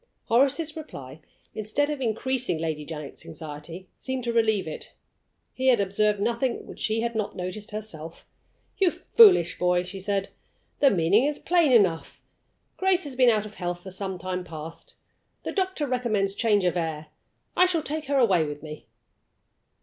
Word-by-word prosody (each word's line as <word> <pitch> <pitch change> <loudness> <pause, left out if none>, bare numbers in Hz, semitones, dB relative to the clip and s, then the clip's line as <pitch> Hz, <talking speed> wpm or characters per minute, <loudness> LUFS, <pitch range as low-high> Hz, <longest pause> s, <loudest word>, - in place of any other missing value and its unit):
Horace's 280 +6 +2
reply, 140 - -9 0.3
instead 220 +8 0
of 290 -2 -4
increasing 250 -2 0
Lady 155 -2 -3
Janet's 150 -2 -7
anxiety, 160 +3 -8
seemed 260 -1 -4
to 235 0 -1
relieve 220 -5 +2
it. 155 - -7 0.6
He 260 0 -1
had 250 -4 +5
observed 205 +1 +1
nothing 235 +3 -1
which - - -11
she 220 +1 0
had 235 0 -1
not 215 -2 -2
noticed 185 +4 -5
herself. 170 -7 -7 0.5
"You 385 -2 +5
foolish 380 - +5
boy!" 180 0 +2
she 190 +2 -7
said, 195 0 -1 0.5
"the 280 - +6
meaning 195 +6 +3
is 295 0 0
plain 340 -5 +2
enough. 190 -9 +2 0.6
Grace 375 -1 +2
has 285 -3 -7
been 250 -1 +5
out 215 -2 +2
of 210 - -9
health 175 -2 -4
for 190 - -8
some 190 0 -4
time 185 0 -4
past. 160 -1 -9 0.5
The - - -3
doctor 375 -6 -1
recommends 230 -7 0
change 205 -3 +2
of 180 - +1
air. 160 -3 -3 0.5
I 365 - +6
shall 335 -4 0
take 310 +1 -3
her 280 0 0
away 195 -10 +4
with 150 -1 -6
me." 155 -1 -9
210 Hz, 165 wpm, -26 LUFS, 175-260 Hz, 0.6 s, the